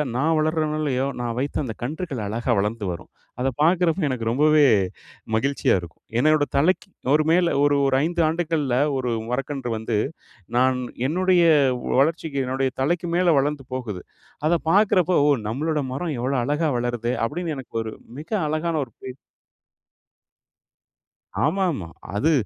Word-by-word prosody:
நான் 155 Hz, +5 st, +2 dB
வளர்றனோ 155 Hz, 0 st, 0 dB
இல்லையோ, 135 Hz, -3 st, 0 dB
நான் 120 Hz, -1 st, -3 dB
வைத்த 140 Hz, +2 st, -2 dB
அந்த 115 Hz, -4 st, -4 dB
கன்றுகள் 150 Hz, -3 st, -4 dB
அழகா 115 Hz, +3 st, -2 dB
வளர்ந்து 105 Hz, +1 st, -2 dB
வரும். 85 Hz, -, -8 dB, 0.3 s
அத 130 Hz, -, +1 dB
பாக்குறப்போ 170 Hz, +1 st, +3 dB
எனக்கு 125 Hz, -3 st, -3 dB
ரொம்பவே 150 Hz, +2 st, +4 dB, 0.7 s
மகிழ்ச்சியா 140 Hz, +5 st, +1 dB
இருக்கும். 85 Hz, -1 st, -13 dB, 0.2 s
என்னோட 155 Hz, +2 st, +4 dB
தலைக்கு 185 Hz, +6 st, +2 dB, 0.2 s
ஒரு 155 Hz, 0 st, +3 dB
மேல, 175 Hz, 0 st, +3 dB
ஒரு 145 Hz, 0 st, +3 dB
ஒரு 130 Hz, -, +2 dB
5 170 Hz, +1 st, 0 dB
ஆண்டுகள்ல 160 Hz, -6 st, -1 dB, 0.2 s
ஒரு 125 Hz, -2 st, -1 dB, 0.2 s
மரக்கன்று 135 Hz, -1 st, -3 dB
வந்து 110 Hz, 0 st, -2 dB, 0.6 s
நான் 130 Hz, 0 st, +3 dB, 0.3 s
என்னுடைய 180 Hz, +2 st, +3 dB, 0.6 s
வளர்ச்சிக்கு 155 Hz, -1 st, 0 dB
என்னுடைய 130 Hz, 0 st, 0 dB
தலைக்கு 170 Hz, +4 st, 0 dB
மேல 175 Hz, -2 st, +4 dB
வளந்து 145 Hz, -1 st, -2 dB
போகுது. 110 Hz, -8 st, -5 dB, 0.4 s
அத 170 Hz, 0 st, +2 dB
பார்க்குறப்போ, 185 Hz, -3 st, +3 dB
"ஓ! -, -, +4 dB, 0.2 s
நம்மளோட 150 Hz, +6 st, -1 dB
மரம் 155 Hz, +1 st, -3 dB
எவ்ளோ 130 Hz, +3 st, -1 dB
அழகா 150 Hz, +4 st, 0 dB
வளருதே!’ 120 Hz, 0 st, -2 dB
அப்டின்னு 160 Hz, +4 st, -3 dB
எனக்கு 130 Hz, -3 st, -10 dB
ஒரு 110 Hz, -, -6 dB, 0.3 s
மிக 155 Hz, -, -10 dB, 0.2 s
அழகான 155 Hz, +2 st, -1 dB
ஒரு 115 Hz, -, -23 dB
பெரு 130 Hz, 0 st, -8 dB, 2.3 s
ஆமா, 195 Hz, 0 st, +1 dB
ஆமா. 90 Hz, -, -5 dB, 0.3 s
அது, 155 Hz, +10 st, +2 dB
145 Hz, 140 wpm, -23 LUFS, 125-165 Hz, 2.3 s, ரொம்பவே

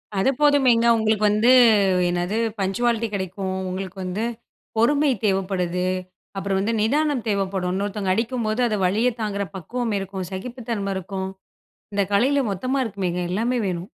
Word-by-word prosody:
அது 195 Hz, +7 st, +2 dB
போதுமேங்க. 265 Hz, -6 st, +4 dB
உங்களுக்கு 215 Hz, -1 st, +1 dB
வந்து 215 Hz, +4 st, +3 dB, 0.6 s
என்னது? 175 Hz, +4 st, -1 dB, 0.2 s
பங்சுவாலிட்டி 230 Hz, +4 st, 0 dB
கெடைக்கும். 190 Hz, 0 st, -3 dB
உங்களுக்கு 190 Hz, +1 st, -5 dB
வந்து, 185 Hz, +5 st, -3 dB, 0.5 s
பொறுமை 285 Hz, +5 st, +3 dB, 0.2 s
தேவைப்படுது. 185 Hz, -2 st, 0 dB, 0.5 s
அப்புறம் 195 Hz, 0 st, -1 dB
வந்து 220 Hz, +4 st, 0 dB
நிதானம் 280 Hz, +1 st, +1 dB
தேவைப்படும். 190 Hz, -3 st, -1 dB
இன்னொருத்தங்க 200 Hz, -1 st, -1 dB
அடிக்கும்போது, 230 Hz, 0 st, -1 dB
அத 215 Hz, -, 0 dB
வலியத்தாங்குற 215 Hz, 0 st, 0 dB
பக்குவமிருக்கும். 195 Hz, -2 st, -3 dB
சகிப்புத்தன்மை 220 Hz, -1 st, -4 dB
இருக்கும். 190 Hz, 0 st, -4 dB, 0.7 s
இந்த 200 Hz, -1 st, +2 dB
கலையில 275 Hz, +6 st, +3 dB
மொத்தமா 255 Hz, +8 st, -1 dB
இருக்குமேங்க, 185 Hz, -5 st, -2 dB
எல்லாமே 240 Hz, +5 st, 0 dB
வேணும். 180 Hz, +2 st, -4 dB
205 Hz, 120 wpm, -23 LUFS, 190-235 Hz, 0.7 s, போதுமேங்க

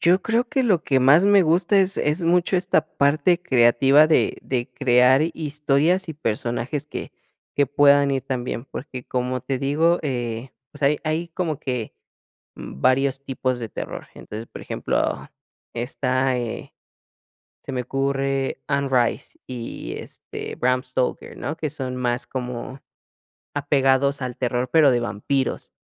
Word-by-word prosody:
Yo 180 Hz, +3 st, +4 dB
creo 235 Hz, +2 st, 0 dB
que 270 Hz, -3 st, +1 dB
lo 185 Hz, -8 st, +2 dB
que 135 Hz, -2 st, +2 dB
más 145 Hz, +8 st, +6 dB
me 200 Hz, -2 st, +6 dB
gusta 175 Hz, +5 st, +3 dB
es 190 Hz, +1 st, +1 dB
es 150 Hz, +4 st, 0 dB
mucho 175 Hz, +2 st, +2 dB
esta 180 Hz, +1 st, +1 dB
parte 155 Hz, +5 st, +3 dB
creativa 135 Hz, 0 st, +5 dB
de 160 Hz, -, +2 dB
de 125 Hz, -2 st, -2 dB
crear 130 Hz, +1 st, +4 dB
hi 165 Hz, -, 0 dB
historias 150 Hz, +4 st, 0 dB
y 160 Hz, -, -5 dB
personajes 125 Hz, +2 st, -3 dB
que -, -, -7 dB, 0.4 s
que 145 Hz, -1 st, +2 dB
puedan 140 Hz, 0 st, +4 dB
ir 135 Hz, -1 st, -1 dB
también, 125 Hz, -2 st, -4 dB
porque 130 Hz, -2 st, -8 dB
como 125 Hz, 0 st, -2 dB
te 130 Hz, 0 st, -2 dB
digo, 160 Hz, +6 st, +2 dB
eh, 120 Hz, -3 st, -3 dB, 0.2 s
pues 145 Hz, -1 st, -12 dB
hay 145 Hz, +2 st, +4 dB
hay 160 Hz, +2 st, -1 dB
como 165 Hz, -4 st, -3 dB
que, 125 Hz, -4 st, -4 dB, 0.6 s
mm, 65 Hz, -, -9 dB
varios 135 Hz, +1 st, +2 dB
tipos 130 Hz, -2 st, -2 dB
de 115 Hz, -2 st, -5 dB
terror, -, -, -7 dB
entonces, 110 Hz, +2 st, -8 dB
por -, -, -10 dB
ejemplo, -, -, -2 dB, 0.4 s
está 130 Hz, +1 st, 0 dB
eh, 120 Hz, -2 st, -5 dB, 0.9 s
se -, -, -6 dB
me 125 Hz, -1 st, -1 dB
ocurre 135 Hz, +1 st, -1 dB
Onrise 135 Hz, -4 st, 0 dB
y, 120 Hz, -2 st, -6 dB
este, -, -, -8 dB
Bram 125 Hz, 0 st, +1 dB
Stoker, 130 Hz, 0 st, -3 dB
¿no? 145 Hz, +6 st, -4 dB
que 155 Hz, -2 st, -2 dB
son 130 Hz, -4 st, -4 dB
más 120 Hz, -1 st, -1 dB
como 125 Hz, +1 st, -5 dB, 0.8 s
apegados 140 Hz, -1 st, +2 dB
al 125 Hz, -1 st, -4 dB
terror, 125 Hz, 0 st, -1 dB
pero 155 Hz, -4 st, +6 dB
de 120 Hz, -, +1 dB
vampiros. 120 Hz, +4 st, -2 dB
135 Hz, 150 wpm, -23 LUFS, 125-155 Hz, 0.9 s, más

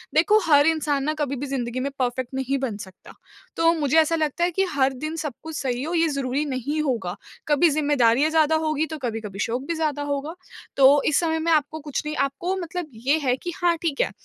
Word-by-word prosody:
देखो 405 Hz, +7 st, +5 dB
हर 290 Hz, -1 st, +6 dB
इंसान 300 Hz, -3 st, +1 dB
ना 305 Hz, +2 st, 0 dB
कभी 280 Hz, -2 st, -1 dB
भी 275 Hz, +2 st, -4 dB
ज़िन्दगी 255 Hz, -2 st, -3 dB
में 275 Hz, +2 st, -2 dB
परफ़ेक्ट 250 Hz, 0 st, -2 dB
नहीं 265 Hz, +1 st, -1 dB
बन 245 Hz, -6 st, -3 dB
सकता। 185 Hz, -, -15 dB, 0.4 s
तो 330 Hz, 0 st, +4 dB
मुझे 295 Hz, +1 st, +2 dB
ऐसा 320 Hz, +1 st, +3 dB
लगता 315 Hz, +1 st, -1 dB
है 355 Hz, -, +2 dB
कि 385 Hz, +3 st, +1 dB
हर 265 Hz, -1 st, +2 dB
दिन 310 Hz, +5 st, -5 dB
सब 300 Hz, -4 st, -4 dB
कुछ 320 Hz, 0 st, -7 dB
सही 255 Hz, -2 st, -2 dB
हो, 320 Hz, +4 st, -3 dB
ये 330 Hz, -1 st, +3 dB
ज़रूरी 275 Hz, 0 st, -1 dB
नहीं 285 Hz, +2 st, -2 dB
होगा। 235 Hz, -11 st, -2 dB, 0.3 s
कभी 300 Hz, +3 st, +4 dB
ज़िम्मेदारियाँ 290 Hz, -2 st, +3 dB
ज़्यादा 320 Hz, -1 st, +3 dB, 0.2 s
होगी 310 Hz, +1 st, 0 dB
तो 315 Hz, -, -5 dB
कभी-कभी 220 Hz, -7 st, -5 dB
शौक 235 Hz, +4 st, -1 dB
भी 335 Hz, -, -1 dB
ज़्यादा 305 Hz, -3 st, -1 dB
होगा। 290 Hz, +3 st, -3 dB, 0.4 s
तो 275 Hz, +1 st, +6 dB
इस 300 Hz, -, +3 dB
समय 320 Hz, -2 st, 0 dB
में 330 Hz, +1 st, 0 dB
आपको 310 Hz, 0 st, +1 dB
कुछ 290 Hz, -2 st, -4 dB
नहीं। 305 Hz, 0 st, -3 dB
आपको 345 Hz, +7 st, -3 dB
मतलब 350 Hz, -2 st, -4 dB
ये 255 Hz, +7 st, +1 dB
है 250 Hz, -2 st, +2 dB
कि 350 Hz, -, -5 dB
हाँ, 345 Hz, -1 st, +2 dB
ठीक 315 Hz, -5 st, -1 dB
है -, -, 0 dB
290 Hz, 225 wpm, -24 LUFS, 265-320 Hz, 0.4 s, हर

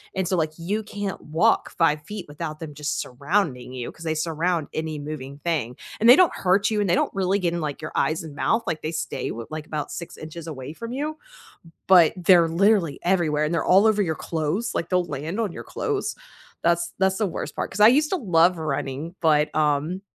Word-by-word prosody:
and 190 Hz, -, 0 dB
so, 185 Hz, -, 0 dB
like, 155 Hz, -1 st, 0 dB
you 200 Hz, +6 st, -2 dB
can't 205 Hz, -2 st, -5 dB
walk 155 Hz, +2 st, +1 dB
5' 165 Hz, +4 st, 0 dB
without 155 Hz, 0 st, -6 dB
them 150 Hz, -2 st, -6 dB
just 150 Hz, 0 st, -2 dB
surrounding 135 Hz, -2 st, -2 dB
you, 125 Hz, -2 st, -5 dB
'cause 165 Hz, -, -12 dB
they 160 Hz, 0 st, 0 dB
surround 165 Hz, +1 st, -1 dB
any 155 Hz, -1 st, -3 dB
moving 145 Hz, -1 st, -7 dB
thing, 145 Hz, -8 st, -2 dB, 0.2 s
and 225 Hz, -, +3 dB
they 250 Hz, -, +11 dB
don't 365 Hz, 0 st, +4 dB
hurt 195 Hz, +3 st, +2 dB
you, 210 Hz, -, +1 dB
and 200 Hz, -3 st, +1 dB
they 175 Hz, -, +4 dB
don't -, -, 0 dB
really 195 Hz, 0 st, +1 dB
get 175 Hz, -3 st, -1 dB
in, 170 Hz, -, -2 dB
like, 150 Hz, -1 st, -4 dB
your 155 Hz, -, -6 dB
eyes 160 Hz, +1 st, 0 dB
and 150 Hz, -3 st, -9 dB
mouth, 225 Hz, +9 st, +1 dB
like, 160 Hz, -4 st, -2 dB
they 155 Hz, +2 st, -4 dB
stay -, -, -3 dB
w 115 Hz, 0 st, -5 dB
like, 155 Hz, 0 st, -6 dB
about 150 Hz, -1 st, -4 dB
6" 165 Hz, -1 st, -8 dB
away 140 Hz, -2 st, -6 dB
from 230 Hz, +8 st, -7 dB
you, 305 Hz, +3 st, -3 dB, 0.7 s
but 175 Hz, -4 st, +7 dB
they're 175 Hz, -1 st, +5 dB
literally 180 Hz, -2 st, +2 dB
everywhere, 165 Hz, -5 st, +1 dB
and 155 Hz, +3 st, -1 dB
they're 165 Hz, -, 0 dB
all 195 Hz, +4 st, +5 dB
over 210 Hz, -1 st, +3 dB
your 160 Hz, -4 st, -1 dB
clothes 165 Hz, +8 st, -2 dB
like, 165 Hz, -, -2 dB
they'll 180 Hz, -1 st, +3 dB
land 155 Hz, +10 st, -4 dB
on 215 Hz, -, -1 dB
your -, -, -8 dB
clothes, 420 Hz, -3 st, -2 dB, 0.5 s
that's 170 Hz, 0 st, +1 dB
that's 190 Hz, 0 st, +2 dB
the 215 Hz, -, +1 dB
worst 175 Hz, -, -5 dB
part. -, -, -3 dB
'Cause 210 Hz, -, -5 dB
I 210 Hz, -, +9 dB
used 300 Hz, +5 st, +3 dB
to 380 Hz, -, +1 dB
love 180 Hz, -, +3 dB
running, 155 Hz, +1 st, -4 dB
but, 150 Hz, -2 st, +3 dB
um, 155 Hz, +4 st, +1 dB
170 Hz, 215 wpm, -24 LUFS, 155-195 Hz, 0.7 s, they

